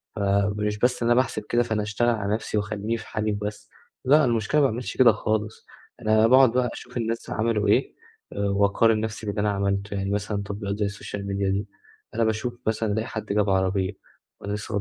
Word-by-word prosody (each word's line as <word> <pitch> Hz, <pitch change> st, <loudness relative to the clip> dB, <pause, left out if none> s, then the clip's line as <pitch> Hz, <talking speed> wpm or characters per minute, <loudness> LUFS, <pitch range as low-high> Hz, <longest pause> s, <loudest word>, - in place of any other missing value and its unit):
فمش 100 Hz, +1 st, 0 dB
بس 125 Hz, -1 st, +1 dB
أنا 120 Hz, +1 st, +4 dB
باحسب 115 Hz, -4 st, 0 dB
كده، 120 Hz, 0 st, +3 dB
فأنا 110 Hz, -2 st, -1 dB
أشتغل 110 Hz, +3 st, 0 dB
على 105 Hz, -3 st, 0 dB
نفْسي 110 Hz, -1 st, -2 dB
وأخليني 105 Hz, +2 st, -2 dB
في -, -, -10 dB
حالي 110 Hz, 0 st, -1 dB
وبس، 105 Hz, +1 st, -5 dB, 0.4 s
لأ، 150 Hz, +2 st, +5 dB
المشكلة 120 Hz, +4 st, +1 dB
ما 140 Hz, -, +5 dB
باعملش 120 Hz, +2 st, -5 dB
كده 125 Hz, -3 st, +7 dB
خالص، 110 Hz, 0 st, -2 dB, 0.4 s
أنا 110 Hz, +1 st, +4 dB
باقعد 130 Hz, -1 st, +6 dB
بقى 125 Hz, -1 st, +1 dB
أشوف 125 Hz, +1 st, -9 dB
الناس 115 Hz, 0 st, -3 dB
عملوا 110 Hz, -2 st, 0 dB
إيه، 105 Hz, -, +2 dB, 0.4 s
وأقارن 100 Hz, +2 st, +2 dB
نفْسي 110 Hz, 0 st, -4 dB
باللي 105 Hz, 0 st, -2 dB
أنا 105 Hz, -, +1 dB
عملته، 100 Hz, 0 st, -1 dB
يعني 95 Hz, 0 st, -2 dB
مثلًا 105 Hz, 0 st, -2 dB
تطبيقات 100 Hz, 0 st, -4 dB
زي 100 Hz, -, +1 dB
الSocial 100 Hz, 0 st, -6 dB
Media 100 Hz, 0 st, -1 dB
دي، 100 Hz, +2 st, -2 dB, 0.5 s
أنا 115 Hz, -, +2 dB
باشوف 110 Hz, +2 st, -1 dB
مثلًا 110 Hz, -1 st, 0 dB
ألاقي 110 Hz, +1 st, -1 dB
حد 110 Hz, -, -5 dB
جاب 105 Hz, 0 st, +1 dB
عربية 95 Hz, 0 st, +1 dB, 0.5 s
وأنا 100 Hz, -, -4 dB
لسه 105 Hz, -1 st, -3 dB
105 Hz, 190 wpm, -25 LUFS, 100-115 Hz, 0.5 s, كده